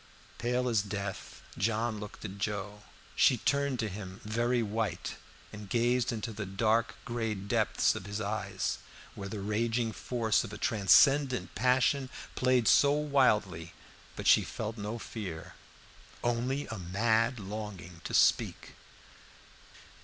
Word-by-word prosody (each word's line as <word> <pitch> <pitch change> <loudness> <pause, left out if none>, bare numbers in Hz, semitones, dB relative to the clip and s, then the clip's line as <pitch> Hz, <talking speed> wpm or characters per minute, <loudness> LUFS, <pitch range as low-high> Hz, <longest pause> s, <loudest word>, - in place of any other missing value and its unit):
Pale 125 +1 0
as 115 -4 +2
death, 100 -1 -6 0.2
John 110 +1 0
looked 105 +1 -8
at 100 0 -7
Joe. 105 0 -3 0.3
She 125 - +5
turned 140 +2 +1
to 115 -2 -1
him, 95 -1 -7
very 120 +2 +1
white, 110 +1 -2 0.4
and 105 -1 -9
gazed 120 +2 +2
into 115 0 -4
the 105 -2 -5
dark 110 +4 +1
gray 115 -4 -2
depths 100 +1 +1
of 95 - -7
his 100 +1 -4
eyes, 105 +1 -2 0.3
where 100 0 -7
the 105 0 -5
raging 115 +3 0
force 110 -1 0
of 115 - -8
a 105 - -6
transcendent 130 +6 +4
passion 130 +2 +2 0.2
played 125 -3 +2
so 140 - +6
wildly; 110 - +1 0.4
but - - -6
she - - +7
felt 110 0 -5
no 105 +1 -4
fear, 95 -8 -7 0.7
only 125 +4 0
a 110 -2 -5
mad 110 +6 +1
longing 100 -4 -7
to - - -2
speak. - - +2
110 Hz, 135 wpm, -31 LUFS, 100-120 Hz, 0.7 s, she